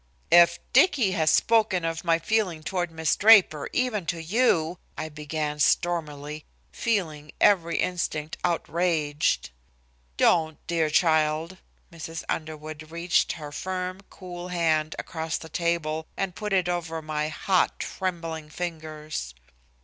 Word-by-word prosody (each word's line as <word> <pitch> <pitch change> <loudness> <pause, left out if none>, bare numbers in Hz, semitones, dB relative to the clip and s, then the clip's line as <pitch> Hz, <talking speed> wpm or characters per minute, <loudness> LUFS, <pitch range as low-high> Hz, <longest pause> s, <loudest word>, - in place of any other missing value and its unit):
"If 170 -1 +7 0.2
Dicky 260 - +4
has 160 -4 +2
spoken 215 -5 +3
of 165 0 -3
my 165 -1 +3
feeling 180 -3 -1
toward 175 0 -2
Miss 160 -1 0
Draper, 200 -8 +5
even 220 -8 -1
to 170 +2 -2
you," 170 -2 +1 0.2
I 155 - -4
began 150 0 -4
stormily, 150 -2 0 0.3
feeling 160 - -2
every 170 -5 +3
instinct 160 -4 -2
outraged. 165 - 0 0.7
"Don't, 160 -3 +3
dear 165 -2 0
child." 160 +2 +2 0.4
Mrs. 165 0 -6
Underwood 155 0 -5
reached 170 +2 +1
her 150 -3 -8
firm, 185 +4 -4
cool 180 -1 -8
hand 160 -3 0
across 160 -1 -3
the 160 - -10
table, 160 -1 -1
and 195 -2 -2
put 210 +4 -5
it 185 -2 +2
over 165 -2 -3
my 155 0 -2
hot, 185 +4 +1
trembling 165 -4 -4
fingers. 155 - -5
165 Hz, 125 wpm, -26 LUFS, 155-180 Hz, 0.7 s, If